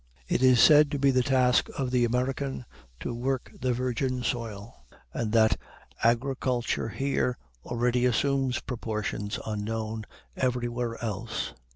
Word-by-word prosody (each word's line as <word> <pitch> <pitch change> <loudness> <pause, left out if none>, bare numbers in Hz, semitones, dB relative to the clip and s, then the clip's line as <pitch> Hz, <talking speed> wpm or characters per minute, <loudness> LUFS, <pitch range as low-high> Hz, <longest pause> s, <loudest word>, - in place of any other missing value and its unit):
It - - 0
is 130 -2 +6
said 150 +1 +7
to 145 - -2
be 140 0 +4
the 130 -1 +3
task 125 -1 +3
of 130 -2 -1
the 125 -1 +3
American 130 +2 -1 0.4
"to - - -3
work 130 +2 -2
the 130 - +1
virgin 125 +1 -1
soil," 115 - -4 0.3
and 110 -2 -2
that 110 -1 +4 0.5
"agriculture 120 0 +1
here 135 0 -1 0.3
already 120 +1 +1
assumes 135 +2 +1
proportions 105 -4 -3
unknown 110 0 -3 0.3
everywhere 120 -2 -1
else." 110 +1 -3
125 Hz, 130 wpm, -28 LUFS, 115-130 Hz, 0.5 s, said